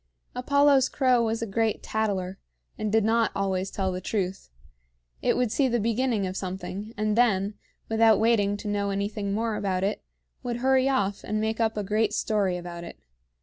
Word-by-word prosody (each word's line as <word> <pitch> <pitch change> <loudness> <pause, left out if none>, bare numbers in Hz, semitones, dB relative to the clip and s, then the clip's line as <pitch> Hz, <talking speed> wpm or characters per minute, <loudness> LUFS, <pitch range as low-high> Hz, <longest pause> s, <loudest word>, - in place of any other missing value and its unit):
Apollo's 280 +1 +3
crow 255 -3 +3
was 225 0 -1
a - - -1
great 225 +1 -1
tattler, 195 -4 -2 0.4
and 215 -1 -3
did 220 0 +3
not 225 +1 +2
always 190 -1 -1
tell 190 -1 -2
the 180 0 -4
truth. 190 - -3 0.7
It - - +1
would 245 -3 +1
see 270 +3 +2
the 240 -1 +1
beginning 230 -1 0
of 185 0 -4
something, 190 +3 -5
and 215 0 0
then, 210 -4 +2 0.3
without 225 -1 +4
waiting 205 -3 +2
to 210 - -7
know 205 -1 -1
anything 200 +1 -2
more 220 +2 -1
about 190 -3 -1
it, 205 +2 -1 0.4
would 240 -2 -3
hurry 265 +1 +3
off 200 -7 0
and 215 +1 -2
make 220 +1 -1
up 220 -1 +1
a 210 - -1
great 210 +1 0
story 200 -5 0
about 175 -1 -7
it. 170 - -9
215 Hz, 185 wpm, -26 LUFS, 195-230 Hz, 0.7 s, without